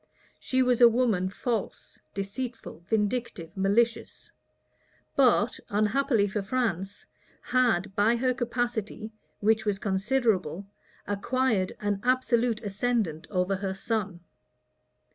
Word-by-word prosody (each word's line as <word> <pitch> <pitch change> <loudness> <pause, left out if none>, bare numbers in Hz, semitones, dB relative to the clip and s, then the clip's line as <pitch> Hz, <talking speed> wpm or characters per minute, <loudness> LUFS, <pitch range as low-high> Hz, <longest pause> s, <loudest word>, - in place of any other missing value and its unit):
She 260 0 +1
was 250 -1 +2
a 240 - +10
woman 225 -6 +1
false, 225 +2 -4 0.2
deceitful, 205 0 -5
vindictive, 210 -6 -2
malicious; 205 +5 0 0.8
but, 245 -4 +3
unhappily 215 +1 +2
for 205 +1 -2
France, 200 -3 -2 0.4
had, 220 -7 +1
by 215 +3 +3
her 255 +1 +1
capacity, 240 -3 -3 0.3
which 220 +1 +3
was 205 -2 0
considerable, 200 - 0 0.4
acquired 205 -1 0
an 205 -1 -1
absolute 245 -2 +1
ascendant 205 -5 -1
over 185 0 0
her 190 -1 -3
son. 195 -4 -2
220 Hz, 105 wpm, -27 LUFS, 195-245 Hz, 0.8 s, a